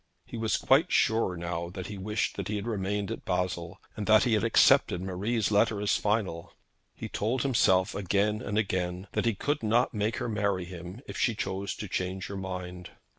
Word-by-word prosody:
He - - -9
was 110 -1 0
quite 155 +7 +3
sure 110 -5 +2
now 85 0 -3
that 95 0 -7
he 100 0 -7
wished 105 +3 -1
he 105 - -2
had 105 - -3
remained 100 -2 -2
at - - -5
Basle, 90 -1 -2 0.2
and 105 - -4
that 110 0 +6
he 120 - +2
had 105 - +2
accepted 110 -5 +5
Marie's 100 +5 -1
letter 105 0 +3
as 105 0 +2
final. 105 -6 -1 0.4
He - - -6
told 120 +5 -1
himself 95 -8 +3
again 100 +2 0
and 105 +1 -3
again 95 -3 -1
that - - -1
he 115 - +2
could 145 +9 -1
not 115 +4 +2
make 105 +1 -1
her - - -2
marry 100 -4 0
him 90 +4 -9
if - - -6
she 120 - +2
chose 95 0 -3
to 105 - -6
change 95 +1 -3
her 100 - -5
mind. 90 -2 -6
100 Hz, 195 wpm, -29 LUFS, 90-110 Hz, 0.4 s, that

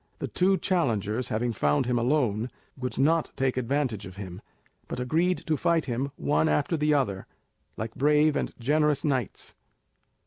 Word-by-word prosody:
The - - -4
two 190 +1 +2
challengers 120 - 0
having 115 +2 -1
found 75 -5 +1
him 120 0 +1
alone 120 -3 +1 0.3
would 125 -1 -5
not 160 +4 +2
take 130 -1 0
any 130 - -1
advantage 125 -6 -1
of 90 - -11
him, 95 -1 -8 0.5
but - - -5
agreed 165 +8 +1
to 160 - +1
fight 165 +2 +1
him 130 +2 -2
one 155 +2 +1
after 150 +3 +1
the 150 -1 +1
other, 125 -10 0 0.5
like 110 +1 -4
brave 150 +1 +3
and - - -1
generous 150 +3 +2
knights. 130 - -2
130 Hz, 165 wpm, -27 LUFS, 115-150 Hz, 0.5 s, brave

